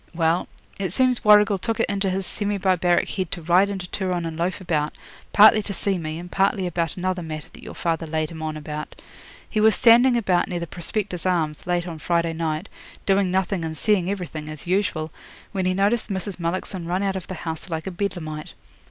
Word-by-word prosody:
Well, 165 +1 +1 0.3
it 190 -4 -1
seems 255 +3 +2
Warrigal 210 -2 +6
took 225 +3 -1
it - - +2
into 200 -1 0
his 190 +1 -1
semi 205 +1 -1
barbaric 180 -2 +2
head 185 -4 -3
to 175 - -5
ride 180 +4 +4
into 190 -2 -4
Turon 180 -2 -2
and 165 -1 -4
loaf 175 +4 -1
about, 155 -5 -1 0.3
partly 215 +1 +7
to 200 - -5
see 195 -1 0
me, 155 -1 -4
and 175 +1 -8
partly 195 -1 +2
about 170 -1 -2
another 185 0 -1
matter 155 -2 -6
that - - -13
your - - -9
father 165 -1 -1
laid 155 0 -1
him 160 -1 -8
on 155 -1 -3
about. 150 0 -7 0.5
He 215 - -1
was 220 0 +6
standing 240 +2 +6
about 185 -6 +2
near 175 - -3
the 170 - -3
Prospectors' 180 +2 -3
Arms, 160 -4 -1
late 175 0 0
on 165 -2 -6
Friday 170 0 0
night, 160 +2 -2 0.4
doing 195 -1 +3
nothing 190 -1 0
and 160 -1 -4
seeing 195 -1 +2
everything, 165 -6 -4
as 155 -1 -8
usual, 175 -4 0 0.4
when 190 -2 -1
he 185 - +1
noticed 205 +5 +1
Mrs. 190 -1 -3
Mullockson 175 +1 -3
run 180 +3 0
out 195 -1 0
of 185 - -5
the 185 - -5
house 160 +1 -6
like 160 -1 -3
a 190 - -3
Bedlamite. 170 -5 -4
180 Hz, 210 wpm, -23 LUFS, 165-195 Hz, 0.5 s, partly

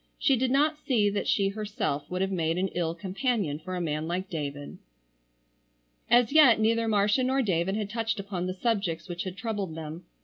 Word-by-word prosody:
She 275 - +3
did 255 +1 0
not 300 +3 +2
see 215 -8 +2
that 205 - -2
she 195 -1 +2
herself 205 - -3
would 180 +1 -2
have 195 - -2
made 165 -2 0
an 190 +1 0
ill 170 -2 -2
companion 190 - -1
for 185 +3 -6
a - - -2
man 155 -1 -2
like 185 +3 -3
David. 145 -3 -5 1.3
As 240 0 +5
yet 275 -8 +7
neither 225 +1 +2
Marcia 210 +3 +2
nor 265 +1 +1
David 190 -1 0
had 210 -1 -3
touched 225 -1 -2
upon 190 -3 -3
the 185 - -2
subjects 195 -6 -1
which 175 0 -5
had 185 0 -6
troubled 205 -7 -3
them. 160 +2 -7
195 Hz, 195 wpm, -28 LUFS, 175-225 Hz, 1.3 s, yet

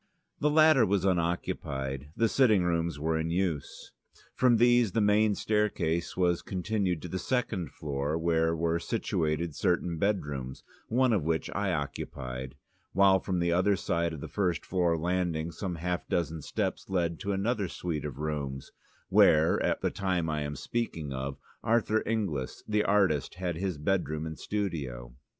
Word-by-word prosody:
The 150 - +2
latter 155 -4 +6
was 100 -2 +1
unoccupied, 75 -6 -1
the 115 - +3
sitting 110 -6 +4
rooms 85 -2 0
were 80 +2 0
in 80 +1 -2
use. 85 -4 -2 0.4
From 125 -2 +4
these 120 -3 +4
the - - +2
main 105 0 +3
staircase 100 -7 0
was 90 -2 +2
continued 95 -3 -1
to - - -4
the 95 +2 -3
second 100 - -1
floor, 70 +2 -3
where 80 0 +1
were 85 +1 0
situated 85 -7 -1
certain 90 +1 0
bedrooms, 75 -10 -2 0.2
one 125 +1 +3
of 100 - +2
which 80 +1 -1
I 100 -1 -1
occupied, 65 -4 -4 0.4
while 95 0 +5
from 95 -1 -2
the 85 0 +1
other 95 +4 +3
side 85 -3 -1
of 80 -3 -7
the - - -5
first 90 -6 -1
floor 90 -3 +1
landing 85 -1 -1
some 90 +2 -4
half 90 +2 -3
dozen 80 -2 -1
steps - - -3
led 85 -3 0
to 100 - -2
another 100 +1 0
suite 85 -3 -4
of 75 -3 -5
rooms, 70 -3 -4 0.4
where, 80 +1 +5
at - - 0
the - - 0
time 90 -4 -1
I 75 -1 -1
am 75 0 -3
speaking 85 -13 -3
of, 65 +1 -4 0.3
Arthur 110 -1 +2
Inglis, 95 - -2
the 105 0 +2
artist, 95 -9 +2
had 90 -2 -3
his 90 -1 -2
bedroom 75 -1 -1
and 80 -1 -6
studio. 70 -13 -3
85 Hz, 160 wpm, -29 LUFS, 75-100 Hz, 0.4 s, latter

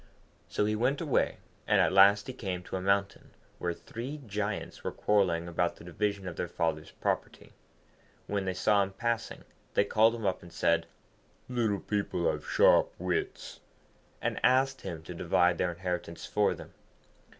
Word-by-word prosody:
So 105 - +1
he 105 +1 +1
went 125 +6 +1
away, 155 -5 +1 0.3
and - - +4
at - - +3
last 100 +1 +6
he 130 - -6
came 95 -7 -4
to - - -6
a 95 - -2
mountain, 100 +1 0 0.2
where 90 - -1
three 130 +6 -7
Giants 105 0 -4
were - - -2
quarrelling 90 -5 +1
about 85 0 0
the - - -14
division 100 +2 -2
of 85 - -6
their 90 - -2
father's 80 -2 -2
property. - - -3 0.7
When 100 -1 -2
they 95 -1 -2
saw 100 +2 +3
him 95 0 -2
passing, 115 +2 -2 0.3
they 100 - +4
called 110 +3 +4
him 115 -2 -5
up, 95 -1 0
and 85 - -13
said, 85 0 +1 0.6
'Little 115 -5 0
people 105 - 0
have - - -6
sharp - - +5
wits,' 400 -2 -3 0.6
and - - -1
asked 130 +1 +3
him 85 -4 -6
to 90 - -7
divide 85 +1 +2
their 90 - +1
inheritance 90 -1 -4
for - - +1
them. - - -12
100 Hz, 170 wpm, -30 LUFS, 90-115 Hz, 0.7 s, last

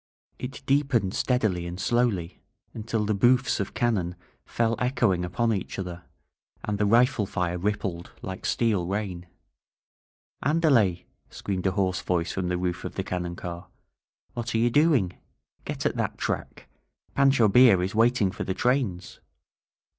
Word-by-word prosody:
It 130 +2 -7
deepened 135 -8 +1
steadily 105 -9 0
and 90 +1 -6
slowly, 110 -7 0 0.3
until 110 -1 -2
the 105 - +1
booffs 125 +6 +3
of 100 - -4
cannon 100 -8 0 0.3
fell 115 0 0
echoing 120 -8 +1
upon 115 +6 0
each 95 - -4
other, 90 -2 -6 0.6
and 105 -1 -2
the 105 - +2
rifle 115 -1 +3
fire 90 -2 -2
rippled 95 -3 -3
like 95 0 -6
steel 105 -7 +1
rain. 95 -3 -3 1.2
AndaleF* 130 - +3 0.3
screamed 95 -1 -3
a 95 - +1
hoarse 95 -1 0
voice 85 -2 -1
from 95 -2 -2
the 90 0 0
roof 90 0 -2
of - - -6
the - - -2
cannon 90 -1 -4
car. 85 0 -7 0.7
"What 120 -1 -4
are - - +3
you 120 +1 +2
doing? 145 - +2 0.5
Get - - -4
at - - 0
that - - -2
track! - - -4 0.5
Pancho 135 -5 +4
Villa 115 -2 +6
is 95 - -2
waiting 115 -3 +3
for - - -5
the 95 - -3
trains!" 120 -9 -1
100 Hz, 150 wpm, -26 LUFS, 90-120 Hz, 1.2 s, Villa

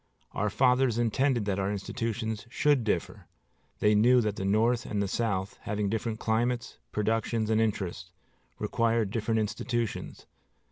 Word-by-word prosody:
Our 105 +1 -1
fathers 125 0 +3
intended 120 0 +1
that 100 -1 -1
our 95 +1 0
institutions 110 +2 -3
should 145 0 +2
differ. 100 -6 -2 0.5
They 105 0 +4
knew 120 +4 +5
that 105 -3 -1
the 95 - -3
North 115 +4 +2
and 105 - -3
the 100 - 0
South, 95 -2 -2
having 105 -2 -2
different 110 +1 -2
climates, 120 +2 -1
productions, 110 +1 0
and 110 0 +3
interests, 95 -4 -2 0.5
required 115 -3 +1
different 110 0 0
institutions. 115 +1 -3
110 Hz, 140 wpm, -29 LUFS, 105-120 Hz, 0.5 s, knew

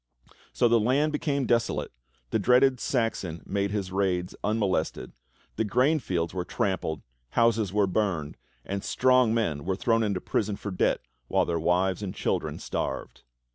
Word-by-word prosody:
So 120 - +3
the 115 0 +4
land 135 +7 +2
became 145 -2 -1
desolate, 115 -1 0 0.4
the - - +2
dreaded 125 +4 +4
Saxon 115 - -1
made 100 0 -1
his 100 -2 -3
raids 90 -2 0
unmolested, 100 -6 -1 0.5
the - - +2
grain 130 +9 +2
fields 85 - -2
were 90 -1 -2
trampled, 90 -4 -2 0.3
houses 115 -4 +3
were 105 0 +3
burned, 90 -6 -1 0.3
and 100 0 -3
strong 130 -2 +3
men 80 -11 0
were 95 +1 -1
thrown 115 +3 +2
into 100 -4 0
prison 105 +2 -1
for 100 - -6
debt 90 - +1 0.3
while - - +2
their 85 -1 -1
wives 90 +3 +1
and 100 -3 -5
children - - -1
starved. - - -4
100 Hz, 155 wpm, -27 LUFS, 90-115 Hz, 0.5 s, the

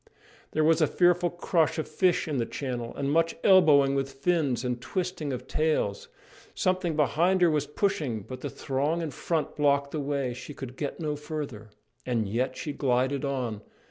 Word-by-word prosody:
There 155 - +2
was 160 +1 +4
a 155 - +5
fearful 175 0 +3
crush 170 -2 +1
of 155 - -2
fish 175 +3 +1
in 150 -3 -1
the 120 - 0
channel, 120 -3 -4
and 140 0 -1
much 165 +2 +2
elbowing 150 -8 +6
with 135 0 -1
fins 140 -4 0
and 125 -1 -2
twisting 180 -1 -3
of 125 -1 -5
tails. 155 -10 0 0.5
Something 185 -3 0
behind 170 +6 +2
her 170 - +5
was 150 -2 0
pushing, 150 - -1
but 130 +6 -9
the - - -3
throng 150 +5 -1
in 155 - -3
front 160 +4 -2
blocked 140 -1 +2
the 155 - -3
way: 140 -3 -1
she 130 +4 -9
could 130 -2 -7
get 145 0 -4
no 150 -2 -2
farther. 145 -8 -6 0.3
And 115 -4 -1
yet 125 +5 -1
she 150 - -4
glided 130 +1 +1
on! 125 -7 -2
145 Hz, 180 wpm, -27 LUFS, 130-160 Hz, 0.5 s, elbowing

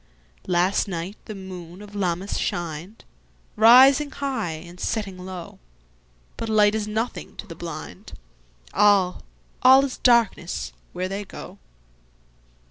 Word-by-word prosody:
Last 180 +4 +2
night 180 +1 -5
the 215 - -7
moon 185 -2 -9
of 205 0 -12
Lammas 190 -1 -2
shined, 175 +4 -4 0.5
Rising 260 +6 +7
high 270 - -3
and 170 +3 -11
setting 205 -3 -2
low; 180 -2 -8 0.8
But 225 - -4
light 210 -1 +4
is 215 -1 -2
nothing 220 +3 -4
to - - -8
the - - -9
blind—All, - - -2 0.4
all 265 +2 +7
is 265 - -6
darkness 235 -8 +2 0.2
where 180 +1 -2
they 195 +2 -4
go. - - -11
195 Hz, 120 wpm, -24 LUFS, 175-220 Hz, 0.8 s, Rising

